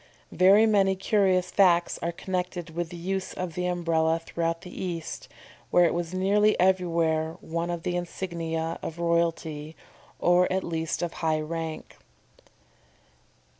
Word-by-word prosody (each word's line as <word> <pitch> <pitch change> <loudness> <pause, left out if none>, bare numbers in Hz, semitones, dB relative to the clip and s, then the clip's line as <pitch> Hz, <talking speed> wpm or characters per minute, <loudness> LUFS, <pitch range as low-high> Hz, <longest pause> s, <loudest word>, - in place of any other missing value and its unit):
Very 195 +4 +6
many 195 -3 +3
curious 190 -2 +2
facts 175 -3 +3
are 170 - -1
connected 180 -1 -4
with 170 0 -3
the 175 - -8
use 190 +2 -3
of 180 -2 -4
the 180 +2 -2
Umbrella 165 -2 +1
throughout 165 0 -3
the 180 - -7
East, 170 -3 -5 0.4
where 175 - +5
it - - +2
was 170 -1 -3
nearly 205 +3 +2
everywhere 165 -3 +1
one 170 +1 -3
of 170 -1 -4
the 175 - -1
insignia 165 -2 -3
of 165 - -6
royalty, 165 -2 -1 0.4
or 175 +1 +3
at 190 +1 0
least 165 0 -2
of 170 - -3
high 160 -1 +1
rank. 160 0 -5
170 Hz, 140 wpm, -27 LUFS, 165-185 Hz, 0.4 s, Very